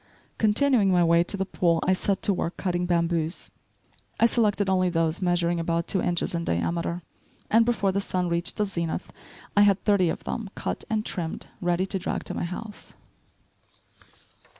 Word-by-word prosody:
Continuing 220 0 +3
my 175 -1 +4
way 170 0 +4
to 200 - -2
the 195 - -1
pool, 170 -3 +1
I 185 - +4
set 195 +1 -1
to 200 - +4
work 175 -1 -3
cutting 180 -1 -1
bamboos. 170 -1 0 0.7
I - - +6
selected 210 -4 +2
only 185 -1 +2
those 165 0 0
measuring 175 -1 +1
about 165 0 -1
two 190 - +2
inches 175 0 0
in 170 0 -1
diameter, 170 - -1 0.5
and 225 +1 +5
before 205 -5 +1
the 200 +1 0
sun 180 -2 -1
reached 170 0 -1
the 210 - +2
zenith 170 -2 -4 0.4
I 205 - +6
had 200 -2 +4
thirty 200 -5 +3
of - - -4
them 225 -4 -4
cut - - -3
and 215 -1 -1
trimmed, 165 -3 -4 0.2
ready 175 +1 +1
to 190 0 -3
drag - - -3
to - - -6
my - - -2
house. 205 +4 -7
180 Hz, 175 wpm, -26 LUFS, 170-200 Hz, 0.7 s, I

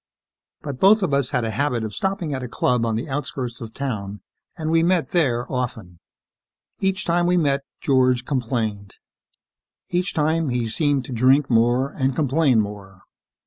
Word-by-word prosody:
But 140 -4 -5
both 205 +2 +5
of 170 - 0
us 140 -2 +1
had 120 - 0
a 110 - -2
habit 125 -3 -1
of 110 -1 -5
stopping 190 - -2
at 130 - -3
a 125 - -5
club 120 0 0
on 110 - 0
the 115 - -3
outskirts 130 -3 -4
of 115 -1 -7
town 105 -7 -5 0.4
and 160 -1 -2
we 165 0 +4
met 175 0 +1
there 130 -10 +1
often. 115 -9 -4 0.8
Each 195 +2 0
time 175 +1 +2
we 180 0 +3
met, 140 -4 +1 0.2
George 130 -2 +2
complained. 115 -7 -2 0.9
Each 180 +1 0
time, 160 0 +1
he 120 -1 -1
seemed 140 +3 0
to - - -9
drink 130 +4 +3
more 120 +4 +3
and 135 -3 -1
complain 140 -3 +2
more. 100 -2 -5
130 Hz, 170 wpm, -22 LUFS, 115-155 Hz, 0.9 s, both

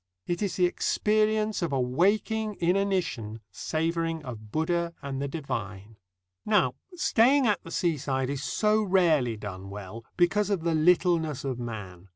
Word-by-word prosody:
It 175 +2 -2
is 200 -3 -1
the 180 - +3
experience 215 +3 +1
of 170 - -1
a 135 - +1
waking 205 - +1
inanition 180 - 0
savouring 165 -1 -2
of 110 -4 -8
Buddha 170 +3 0
and 135 -1 -4
the 140 - -1
divine. 110 - -5 0.5
Now, 195 -12 +3 0.2
staying 275 -5 +4
at 210 -3 +2
the - - -10
seaside 140 -6 -1
is 140 -1 -3
so 215 0 +2
rarely 165 - +2
done 95 -2 -7
well, 105 +3 -8
because 200 +4 +2
of 195 -5 0
the 165 -1 +1
littleness 160 -2 +2
of 130 -3 -3
man. 100 -6 -7
165 Hz, 150 wpm, -27 LUFS, 125-195 Hz, 0.5 s, staying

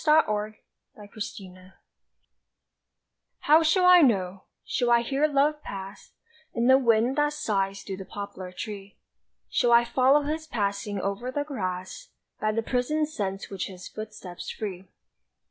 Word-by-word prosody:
The 310 0 +6
Coming 215 0 -2 0.4
of 205 -1 -13
Love 185 -3 -8 1.7
HOW 310 +2 +6
shall 345 +3 +3
I 360 0 +9
know? 195 - +1 0.2
Shall 245 -2 0
I 235 0 +5
hear 275 +5 +1
Love 295 +1 +1
pass 195 -3 -8 0.4
In 235 -1 +1
the 260 +1 +6
wind 235 +2 +2
that 295 0 +2
sighs 195 -7 -1
through 190 - -6
the 190 - -8
poplar 200 -3 -7
tree? 200 +1 -8 0.5
Shall 240 -2 +1
I 235 0 +6
follow 265 +4 +3
his 310 +2 -3
passing 205 -4 -2
over 200 +6 -3
the 290 +3 -2
grass 190 - -5 0.3
By 215 - +1
the 225 +1 -1
prisoned 295 +6 0
scents 195 -9 -4
which 195 - -3
his 185 -1 -10
footsteps 215 -5 -8
free? 190 -3 -6
220 Hz, 145 wpm, -26 LUFS, 195-275 Hz, 1.7 s, I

